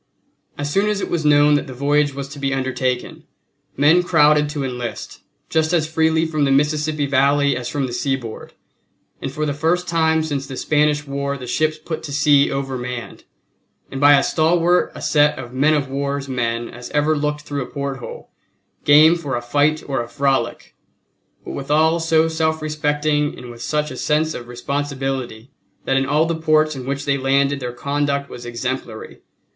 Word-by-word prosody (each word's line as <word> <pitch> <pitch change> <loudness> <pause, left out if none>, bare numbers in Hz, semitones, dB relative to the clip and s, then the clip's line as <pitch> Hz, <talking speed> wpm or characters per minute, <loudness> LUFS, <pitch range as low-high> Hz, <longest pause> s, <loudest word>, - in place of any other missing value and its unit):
As 145 0 -3
soon 200 +2 +2
as 210 -1 -1
it - - -4
was 170 -2 0
known 145 0 +5
that 145 - +1
the 130 - -8
voyage 145 +1 +1
was 140 0 -5
to 145 - -9
be 135 -1 -1
undertaken 130 -1 -2 0.5
men 150 +6 +5
crowded 150 -4 +3
to 150 -2 -3
enlist, 125 -3 -6 0.3
just 160 +1 0
as 160 -3 +2
freely 160 0 +2
from 155 -2 -1
the 140 - +2
Mississippi 150 +1 +1
Valley 140 0 +2
as 125 0 -4
from 140 -2 -1
the 125 - -6
seaboard, 130 -4 -3 0.7
and 135 - -4
for 155 +2 -2
the 145 - -1
first 165 +5 0
time 160 -1 +2
since 140 -3 -3
the 130 -1 -7
Spanish 150 0 +1
War 140 0 -3
the 130 - -8
ships 155 +5 0
put 160 +1 -6
to 145 - -7
sea 145 -1 +4
overmanned 125 -3 -5 0.7
and 135 - -5
by 145 0 +7
as 135 - +1
stalwart 170 +2 +2
a - - -8
set 150 0 +3
of 125 -1 -8
men 145 +4 +3
of 140 -2 -1
war's 140 +1 -3
men 120 -2 -2
as 120 0 -10
ever 150 +1 +1
looked 150 0 -2
through 145 -1 -4
a 125 - -5
porthole, 140 -2 -6 0.5
game 155 +3 +7
for 145 -6 -4
a - - -1
fight 145 +5 +1
or 135 -3 -1
a 120 - -6
frolic, 135 -3 -1 0.7
but - - -6
withal 155 +4 +1
so 165 0 +2
self 160 -1 -1
respecting 150 -1 0
and 125 -1 -9
with 120 0 -12
such 150 +3 -1
a - - -7
sense 155 +1 0
of 120 - -8
responsibility 135 -2 -4 0.3
that 135 - +1
in 135 0 +1
all 150 +3 +2
the 165 - -1
ports 155 -1 +2
in 130 -1 -7
which 140 +1 -3
they 140 -1 +1
landed 140 +1 +1
their 125 -2 -4
conduct 140 +2 -2
was 120 0 -8
exemplary. 120 -1 -5
145 Hz, 185 wpm, -20 LUFS, 135-155 Hz, 0.7 s, by